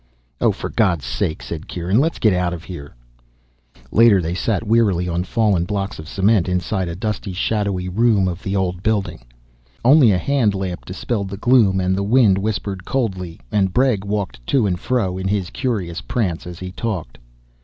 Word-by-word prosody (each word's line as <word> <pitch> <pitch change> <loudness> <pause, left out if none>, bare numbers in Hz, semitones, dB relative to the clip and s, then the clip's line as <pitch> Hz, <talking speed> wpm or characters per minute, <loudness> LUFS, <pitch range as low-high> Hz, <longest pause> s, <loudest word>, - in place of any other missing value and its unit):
"Oh, - - +3
for - - -5
God's 90 - +1
sake," 80 +5 -2
said 85 0 -6
Kieran, 90 +5 0
"let's 160 +4 +1
get 110 -3 +3
out 90 -1 0
of 85 - -10
here." 80 -9 -9 1.0
Later, 115 -3 +6
they 85 -1 -2
sat 110 +4 -1
wearily 105 -6 +2
on 85 0 -1
fallen 105 -3 +1
blocks 100 0 -3
of 80 0 -9
cement 100 -2 +2
inside 90 +1 -1
a 85 - -4
dusty, 105 0 -3
shadowy 100 -1 -1
room 105 0 +2
of 90 +1 -4
the 100 0 -3
old 90 -2 -1
building. 105 - -1 0.6
Only 135 -1 +7
a 95 - +2
hand 115 0 +1
lamp 95 -2 -4
dispelled 100 +2 -3
the 100 - -6
gloom, 110 -5 +4
and 95 0 +1
the 100 - -1
wind 105 -2 +4
whispered 100 -2 -3
coldly, 95 - -3
and 95 -3 +1
Bregg 125 -6 +2
walked 100 -10 -3
to 130 -6 +2
and 90 -3 -1
fro 100 -7 -1
in 95 - -2
his 95 -3 -1
curious 100 - -2
prance 85 - -2
as 90 -1 -7
he 90 +1 -7
talked. 90 - -4
95 Hz, 185 wpm, -20 LUFS, 90-110 Hz, 1.0 s, Only